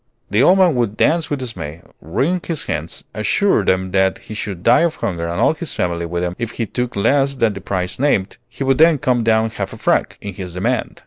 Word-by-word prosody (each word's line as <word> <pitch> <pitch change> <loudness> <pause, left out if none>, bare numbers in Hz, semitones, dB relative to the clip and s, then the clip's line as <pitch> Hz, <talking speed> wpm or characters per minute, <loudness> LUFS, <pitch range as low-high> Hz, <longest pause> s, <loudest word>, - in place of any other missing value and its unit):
The 105 - +3
old 180 +7 +6
man 185 -4 +5
would 115 -5 -1
dance 165 0 +2
with 145 - -1
dismay, 85 -10 -6 0.2
wring 135 - -1
his 165 -4 -2
hands, 80 +1 -4
assure - - +2
them 95 0 0
that 95 0 +2
he - - -10
should 100 -4 -5
die 120 - +5
of 170 -2 +1
hunger 85 -3 -3
and 85 +1 -3
all - - +4
his 160 0 -3
family 85 -1 -1
with 85 +1 -2
him 90 0 -2
if 115 -1 -3
he 115 - -2
took 125 +3 -3
less 135 +7 +2
than 115 -5 +1
the - - -8
price 90 0 -3
named; 125 -9 +1
he - - -5
would 135 0 +2
then 160 -1 +6
come 125 -2 +1
down 110 0 +2
half - - -5
a - - -8
franc - - 0
in 100 -1 -7
his 90 -2 -7
demand. 115 +6 -2
110 Hz, 235 wpm, -19 LUFS, 90-135 Hz, 0.2 s, old